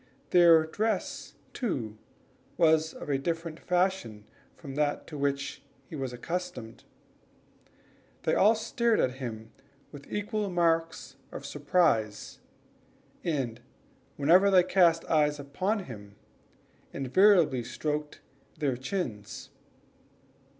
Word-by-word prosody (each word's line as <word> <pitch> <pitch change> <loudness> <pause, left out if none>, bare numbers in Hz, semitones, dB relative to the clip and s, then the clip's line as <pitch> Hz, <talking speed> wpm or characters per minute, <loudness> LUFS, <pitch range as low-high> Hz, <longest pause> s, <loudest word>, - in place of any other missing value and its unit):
Their 170 -3 +7
dress, 210 +4 -3 0.2
too, 125 - -3 0.6
was 160 -1 +3
of - - -9
a 140 -2 0
different 165 +2 -3
fashion 180 - -1 0.3
from 140 -5 -9
that 145 0 -1
to 155 - -10
which 140 -1 -2 0.2
he - - -9
was 135 -3 -3
accustomed. 125 -4 -5 1.4
They - - +1
all 215 +4 +5
stared 230 +1 0
at 130 +1 0
him 110 -3 -6 0.4
with 145 -1 -12
equal 210 0 -2
marks 165 -5 0
of - - -8
surprise, 145 - 0 0.8
and 130 -8 -2 0.6
whenever 175 +8 +5
they 185 -2 +6
cast 175 -3 +3
their - - -9
eyes 150 -2 +2
upon 185 +9 -2
him, 105 - -11 0.8
invariably 150 - +3
stroked 150 +3 -4 0.4
their 135 -5 -1
chins. 130 - -5
155 Hz, 110 wpm, -29 LUFS, 135-180 Hz, 1.4 s, Their